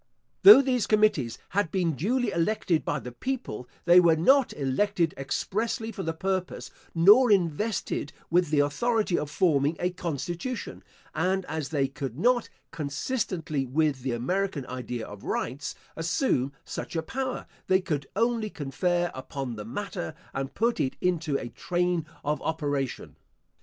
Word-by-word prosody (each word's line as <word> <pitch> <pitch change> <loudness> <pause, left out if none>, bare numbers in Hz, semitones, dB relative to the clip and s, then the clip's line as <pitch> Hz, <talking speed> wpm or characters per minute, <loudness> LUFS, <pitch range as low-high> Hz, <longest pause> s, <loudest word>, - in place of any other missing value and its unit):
Though 390 -9 +11
these 250 -4 +1
committees 210 - +2
had 200 -3 0
been 180 -3 +1
duly 215 - 0
elected 170 -2 +1
by 145 - -1
the 125 -3 -7
people, 245 - -4 0.2
they 175 +1 +8
were 170 -2 +5
not 265 - +4
elected 165 +5 0
expressly 220 +11 -2
for 200 - -6
the 165 - -1
purpose, 185 +2 -3 0.2
nor 210 +10 +7
invested 180 -3 0 0.2
with 175 -1 +3
the 145 -1 +3
authority 210 +7 +1
of 150 - -1
forming 150 -2 +2
a 180 - 0
constitution; 175 - -4 0.3
and 190 0 0
as 155 -4 -4
they 140 -2 +1
could 135 -3 -6
not, 240 +6 +2 0.2
consistently 160 - -2
with 145 0 +1
the 130 -1 -2
American 160 +4 -1
idea 125 -2 -5
of 105 -1 -11
rights, 130 +4 -3 0.2
assume 165 - 0
such - - -6
a 165 - 0
power, 260 +8 -3 0.2
they 185 0 +4
could 150 -7 -3
only 230 0 +1
confer 175 +4 -1
upon 130 -1 -5
the 105 -1 -7
matter, 175 - -5 0.2
and 135 0 -4
put 235 +2 +1
it 130 - 0
into 165 -5 0
a 120 - -6
train 175 +3 -1 0.2
of 150 +1 0
operation. 145 -5 -3
165 Hz, 145 wpm, -27 LUFS, 140-205 Hz, 0.3 s, Though